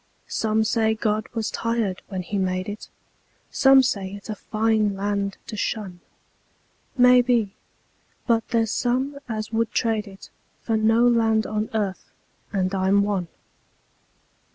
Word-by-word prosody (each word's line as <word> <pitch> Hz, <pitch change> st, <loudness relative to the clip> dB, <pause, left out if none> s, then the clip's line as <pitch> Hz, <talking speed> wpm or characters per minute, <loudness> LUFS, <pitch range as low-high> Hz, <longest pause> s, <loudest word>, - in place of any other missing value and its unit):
Some 220 Hz, 0 st, 0 dB
say 220 Hz, 0 st, +1 dB
God 215 Hz, -1 st, -1 dB
was 220 Hz, -2 st, -2 dB
tired 230 Hz, -5 st, -1 dB
when 190 Hz, -3 st, -4 dB
He 200 Hz, +2 st, -3 dB
made 185 Hz, 0 st, -1 dB
it; 205 Hz, +1 st, -7 dB, 0.6 s
Some 270 Hz, -1 st, +6 dB
say 195 Hz, -6 st, -2 dB
it's 200 Hz, +2 st, -8 dB
a -, -, -4 dB
fine 215 Hz, -1 st, 0 dB
land 200 Hz, 0 st, -2 dB
to -, -, -7 dB
shun; 205 Hz, -4 st, -3 dB, 1.0 s
Maybe; 245 Hz, -4 st, +4 dB, 0.7 s
but 230 Hz, -2 st, +1 dB
there's 225 Hz, -2 st, +1 dB
some 260 Hz, +3 st, -1 dB
as 215 Hz, -1 st, -4 dB
would 225 Hz, 0 st, 0 dB
trade 220 Hz, -2 st, 0 dB
it 195 Hz, 0 st, -13 dB, 0.3 s
For 225 Hz, -, 0 dB
no 225 Hz, +2 st, +4 dB
land 225 Hz, -2 st, +3 dB
on 215 Hz, 0 st, -2 dB
earth 200 Hz, -3 st, -2 dB, 0.4 s
and 190 Hz, -2 st, -1 dB
I'm 195 Hz, +1 st, +3 dB
one. 200 Hz, -4 st, -1 dB
215 Hz, 135 wpm, -24 LUFS, 200-230 Hz, 1.0 s, Some